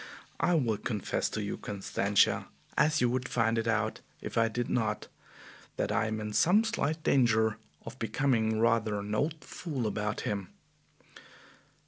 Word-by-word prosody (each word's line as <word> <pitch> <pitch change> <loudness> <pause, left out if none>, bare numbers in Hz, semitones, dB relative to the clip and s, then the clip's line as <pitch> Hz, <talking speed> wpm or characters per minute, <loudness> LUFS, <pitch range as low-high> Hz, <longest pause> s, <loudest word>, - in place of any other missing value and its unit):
I 175 - +3
will 120 -9 +1
confess 105 -6 -1
to 110 - -3
you, 100 - -4
Constantia, 100 0 +1 0.3
as 155 -1 +3
you 125 - +4
would 125 0 -2
find 115 -1 +2
it 115 - -2
out 110 -1 0 0.2
if - - -7
I 115 0 +4
did 120 +2 -2
not, 110 -3 -1 0.7
that - - -1
I 115 0 +1
am 110 0 -2
in 105 0 -4
some 190 - +5
slight 160 -9 -1
danger 110 -4 +3 0.3
of 130 - -9
becoming 110 -1 +1
rather 115 -2 +2
an 100 +1 -4
old 150 +8 -1
fool 145 -9 -4
about 105 0 -2
him." 100 -3 -3
115 Hz, 155 wpm, -30 LUFS, 105-130 Hz, 0.7 s, some